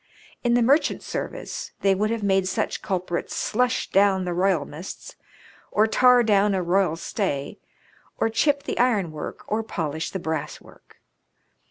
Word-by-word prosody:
In 240 -1 +3
the 240 - +4
merchant 280 +6 +2
service - - -5
they 195 -1 +4
would 210 +3 0
have 230 -2 -2
made 190 -1 +2
such 185 - -2
culprits 180 -2 -3
slush 250 +3 0
down 195 -1 +3
the 175 - -2
royalmasts, 175 -2 -2 0.6
or 215 - +3
tar 250 +2 +5
down 205 -2 +3
a 185 - 0
royal 180 -1 +2
stay, 165 -5 -3 0.6
or - - +2
chip 280 +6 +1
the - - -4
ironwork, 200 -11 -1
or 215 +2 -1
polish 160 -7 -3
the - - -4
brasswork. 160 -4 -6
195 Hz, 145 wpm, -24 LUFS, 175-225 Hz, 0.6 s, tar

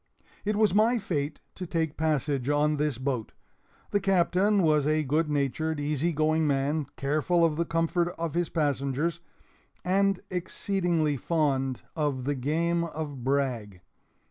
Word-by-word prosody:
It 210 +1 +1
was 215 -2 +3
my 225 +4 +4
fate 155 -8 -3
to 180 - -7
take 160 -2 -1
passage 145 -4 0
in 150 +1 +2
this 150 -4 0
boat. 130 -3 -3 0.6
The 205 - +2
Captain 195 +1 +2
was 150 -3 +3
a 155 0 +2
good 150 +3 +1
natured, 150 +2 -1
easy 150 +3 0
going 155 0 +1
man, 140 +1 0
careful 155 +5 +2
of 160 -2 +1
the 170 +2 0
comfort 165 +1 0
of 165 -2 -3
his 175 0 0
passengers, 145 +1 -1 0.7
and 195 +1 +2
exceedingly 175 -4 0
fond 135 -5 0
of 145 -5 -1
the 145 +3 0
game 165 +6 0
of 150 -5 -5
brag. 125 -8 -1
155 Hz, 145 wpm, -28 LUFS, 140-170 Hz, 0.7 s, my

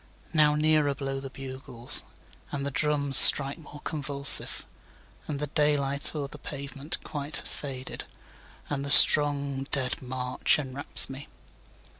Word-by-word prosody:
6Now 150 -2 -2
nearer 155 -2 -3
blow 135 -1 -9
the 135 0 -13
bugles, 130 -2 -5 0.5
And 140 -1 -9
the 140 - -8
drums 145 -1 -1
strike 140 +2 +8
more 145 -2 -18
convulsive; 140 -2 0 0.6
And 150 - -9
the 150 - -8
day 150 0 -4
light 140 +2 -5
o'er 145 -2 -8
the 150 - -18
pavement 140 +2 -11
quite 145 0 -10
has - - +2
faded, 130 -2 -12 0.6
And 140 -1 -9
the 140 - -10
strong 140 -2 +4
dead 130 -3 -7
march 125 0 -6
enwraps 140 -1 +1
me. 135 +2 -14
140 Hz, 140 wpm, -22 LUFS, 135-150 Hz, 0.6 s, strike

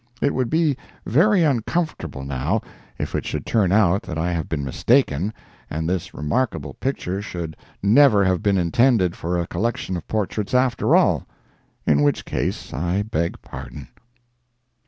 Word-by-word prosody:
It 140 - +1
would 130 -2 0
be 160 -3 +2 0.3
very 180 - +4
uncomfortable, 130 - -1
now, 65 -1 -1 0.4
if - - -4
it - - -1
should - - -4
turn 100 -6 +2
out 100 -2 +4
that 75 - -6
I 85 +2 0
have 80 -3 -3
been 75 -3 -2
mistaken, 100 - +2 0.4
and 80 +1 -3
this 90 -1 -2
remarkable 75 - -2
picture 100 - -3
should 85 -5 -5 0.3
never 105 -1 +6
have 95 -1 +1
been 100 -2 +2
intended 95 +1 +3
for 90 +2 -2
a 85 - 0
collection 95 +1 -2
of 85 - -6
portraits, 105 +1 -2
after 125 -2 +3
all—in 75 -1 0
which 75 0 +1
case - - -3
I 85 +9 0
beg 85 -5 -2
pardon. 65 +1 -9
95 Hz, 150 wpm, -22 LUFS, 80-120 Hz, 0.4 s, never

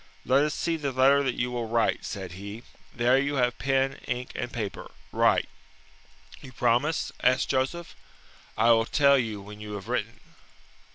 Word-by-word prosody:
"Let 135 +3 +4
us 150 - -2
see 165 -1 -1
the 145 -3 -2
letter 135 +2 +4
that 130 -3 -1
you 125 +1 -1
will 120 -2 -3
write," 115 0 0
said 95 -3 -6
he. 100 +5 -8 0.3
"There 125 +2 +3
you 140 +1 -1
have 125 -2 0
pen, 135 0 0
ink, 125 0 -3
and 120 - -4
paper. 110 -4 -5 0.2
Write." - - +3 0.9
"You 135 - -11
promise?" 125 +6 +1
asked 125 +1 +2
Joseph. 135 +6 -2 0.6
"I 120 - +5
will 115 -1 +4
tell 140 +1 +4
you 110 -5 -3
when 105 +1 -11
you 105 0 -7
have 100 0 -7
written." 115 -2 -3
125 Hz, 170 wpm, -27 LUFS, 115-135 Hz, 0.9 s, I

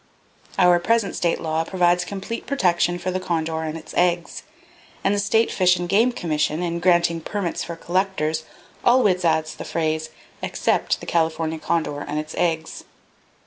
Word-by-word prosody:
"Our 180 -1 +5
present 225 +3 +1
state 170 -1 0
law 160 0 -1
provides 175 0 +2
complete 200 +4 -6
protection 175 -9 +2
for 185 +1 -3
the 185 - -1
condor 160 -3 -2
and 160 0 -4
its 160 - -11
eggs; 175 -1 +1 0.6
and 195 - +2
the 205 - +1
State 220 +2 +2
Fish 180 -1 +3
and 175 0 -3
Game 220 +7 +3
Commission, 155 -4 -1
in 170 -1 -2
granting 170 -2 +3
permits 190 0 -3
for 170 - -6
collectors, 170 -3 -1 0.4
always 225 -8 +4
adds 160 -1 +1
the - - -8
phrase—'except 155 -1 -2
the - - -7
California 160 -1 0
condor 155 -3 -1
and 145 +1 -4
its 155 0 -4
eggs.' 160 -2 -1
175 Hz, 155 wpm, -23 LUFS, 160-185 Hz, 0.6 s, Our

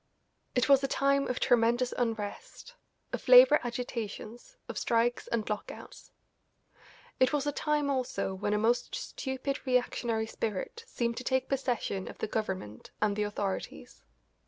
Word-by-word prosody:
It 250 - +3
was 275 -1 +6
a - - +2
time 275 +1 +2
of 250 - -2
tremendous 240 0 +3
unrest, 230 - -4 0.4
of - - -4
labour - - +9
agitations, 240 - -6
of - - -4
strikes 235 +1 +1
and 225 -2 -1
lockouts. 210 -1 -7 1.1
It 255 - +4
was 295 -2 0
a 290 - +1
time 295 0 0
also 255 -8 -1
when 205 +2 -1
a - - +2
most 230 +3 +1
stupid 270 +1 -4
reactionary 245 -3 0
spirit 220 - -4
seemed 235 - -2
to 255 - -4
take 260 +1 0
possession 245 -8 -1
of - - -9
the - - -2
Government 190 - -4
and 210 -1 +1
the 210 - -1
authorities. 205 -2 -4
240 Hz, 145 wpm, -30 LUFS, 215-270 Hz, 1.1 s, labour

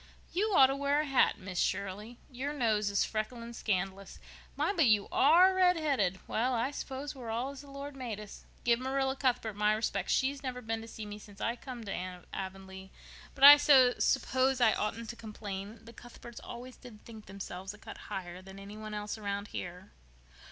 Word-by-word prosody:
You 420 +4 +1
ought 265 - +9
to 270 +1 0
wear 280 +1 +1
a - - -3
hat, 270 -2 +3
Miss 185 -3 -5
Shirley. 200 +4 -2
Your 265 +4 -4
nose 220 -6 +1
is 200 -1 +2
freckling 230 +2 -4
scandalous. 195 -2 -3 0.4
My, - - 0
but 325 -8 +3
you 210 -2 +3
are 345 +7 +6
redheaded! 310 - +2
Well, 250 +3 0
I 240 +4 0
s'pose 280 0 -5
we're 250 -5 -8
all 240 +5 -2
as 280 -1 -10
the 285 - -14
Lord 280 +1 -7
made 240 -6 -5
us! 210 -1 -10 0.2
Give 235 -1 +3
Marilla 265 +1 0
Cuthbert 245 -6 0
my 210 +1 +3
respects. 210 -3 -1
She's 275 +1 +1
never 255 -2 -4
been 225 -1 -3
to 225 - -9
see 220 -1 -8
me 210 0 -8
since 205 -1 -15
I 235 - -1
come 245 -1 -8
to 185 -3 -5
Avonlea, 190 0 -7 0.5
but - - -4
I 290 +1 +13
s'pose 260 -1 +4
I 225 -3 +5
oughtn't 225 +2 -3
to - - -12
complain. 210 -1 -7
The 230 - -12
Cuthberts 240 0 -12
always 245 +1 -9
did 230 -4 -14
think 220 -2 -12
themselves 190 -1 -7
a - - -16
cut - - -10
higher 180 -1 -6
than 190 +1 -12
any 200 +2 -9
one 215 0 -6
else 210 +1 -4
round 200 0 -4
here." 180 +2 -7
230 Hz, 195 wpm, -31 LUFS, 200-265 Hz, 0.5 s, I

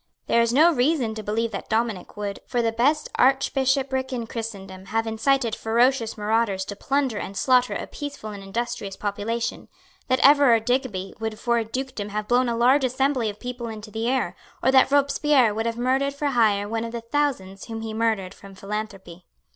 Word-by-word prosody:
There 235 - +3
is 235 0 +2
no 320 +7 +5
reason 255 -3 +1
to 220 - -6
believe 220 +2 -1
that 195 - -6
Dominic 220 -4 -2
would, 205 -1 -4
for 240 -1 0
the 225 - +1
best 285 +7 +1
archbishopric 265 0 +2
in 240 -3 -3
christendom, 195 -5 -7
have 225 +3 -1
incited 230 +2 +1
ferocious 235 +1 +1
marauders 210 -2 0
to 205 - -6
plunder 270 -1 -1
and 195 - -6
slaughter 250 -1 +3
a - - -4
peaceful 285 -7 -7
and 200 -1 -8
industrious 210 0 -4
population, 210 +3 -3 0.4
that 255 - +2
Everard 275 -6 +6
Digby 245 -7 -1
would 220 -1 -4
for 235 0 +1
a - - -1
dukedom 255 -3 -4
have 210 0 -4
blown 245 +1 +3
a 230 - -1
large 260 +4 +4
assembly 260 -2 +1
of 205 - -8
people 245 -1 -5
into 215 -1 -8
the 225 +3 -2
air, 250 -9 0 0.3
or 260 - +4
that 265 0 +5
Robespierre 280 -4 +3
would 225 +2 -2
have 230 0 -3
murdered 265 +3 0
for 285 0 -1
hire 215 -5 +2
one 225 +1 -2
of 230 0 -6
the 235 - -4
thousands 230 -7 -2
whom 225 -1 -6
he 220 -1 -5
murdered 220 -4 -1
from 195 -1 -14
philanthropy. 195 -3 -7
230 Hz, 190 wpm, -24 LUFS, 210-260 Hz, 0.4 s, Everard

